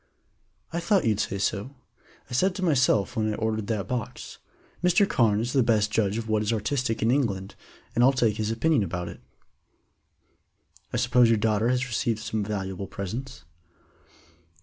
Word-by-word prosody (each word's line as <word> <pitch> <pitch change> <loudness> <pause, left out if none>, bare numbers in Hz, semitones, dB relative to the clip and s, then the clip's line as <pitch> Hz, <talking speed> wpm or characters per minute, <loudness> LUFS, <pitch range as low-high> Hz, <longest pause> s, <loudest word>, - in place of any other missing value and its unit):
"I 170 - 0
thought 175 -1 +2
you'd 110 -2 +1
say 100 -2 -1
so. 105 +7 -2 0.5
I - - -10
said 185 +9 +2
to 190 - -4
myself 130 - +2
when 110 -2 0
I - - -3
ordered 110 -2 -2
that 105 -4 -2
box, 125 -1 -5 0.4
'Mr. 180 +3 +4
Carne 110 - +2
is 120 +2 -3
the 135 - +4
best 110 -3 +2
judge 105 -1 +1
of 115 -1 -4
what 110 -1 +1
is 105 +1 0
artistic 115 +1 -1
in 115 - +3
England, 100 -8 -1 0.4
and 120 - +3
I'll 130 - +7
take 115 -5 +1
his 110 -1 -1
opinion 130 +4 +2
about 90 -2 -3
it.'" - - -11 1.7
"I - - -1
suppose 120 -1 +4
your 115 - +4
daughter 110 +1 +1
has 125 0 +1
received 120 -1 -1
some 110 -1 -3
valuable 95 -2 -4
presents?" 100 +6 -6
110 Hz, 170 wpm, -26 LUFS, 105-125 Hz, 1.7 s, I'll